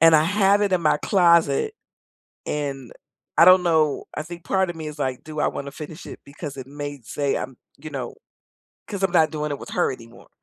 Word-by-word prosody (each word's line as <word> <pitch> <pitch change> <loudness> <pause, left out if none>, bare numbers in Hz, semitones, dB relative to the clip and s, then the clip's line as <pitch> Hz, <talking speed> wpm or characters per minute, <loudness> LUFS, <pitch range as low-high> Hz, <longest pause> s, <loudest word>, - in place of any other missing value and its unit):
and 165 -1 +8
I 155 - +4
have 200 +2 +3
it 200 - +1
in 185 - +3
my 150 - +4
closet, 170 - +3 0.7
and, 140 -4 -4 0.4
I - - +8
don't 185 0 +8
know, 160 -4 +2
I 150 - -2
think 170 +1 -10
part 190 -1 +1
of 175 - -5
me 160 -1 -6
is 150 - -7
like, 130 -2 -2
"Do 155 -1 -6
I - - +2
wanna 140 0 -5
finish 155 +3 -9
it," - - -9
because 140 0 -8
it 130 - -6
may 145 -1 -6
say 140 +4 -1
I'm, 130 -1 -6 0.2
you 155 +2 -9
know 135 -5 -5 0.7
'cause 200 -2 -5
I'm 190 - +2
not 160 -3 +4
doing 150 -1 -3
it 145 - -3
with - - -10
her - - +1
anymore, 115 -1 -13
155 Hz, 220 wpm, -23 LUFS, 140-175 Hz, 0.7 s, and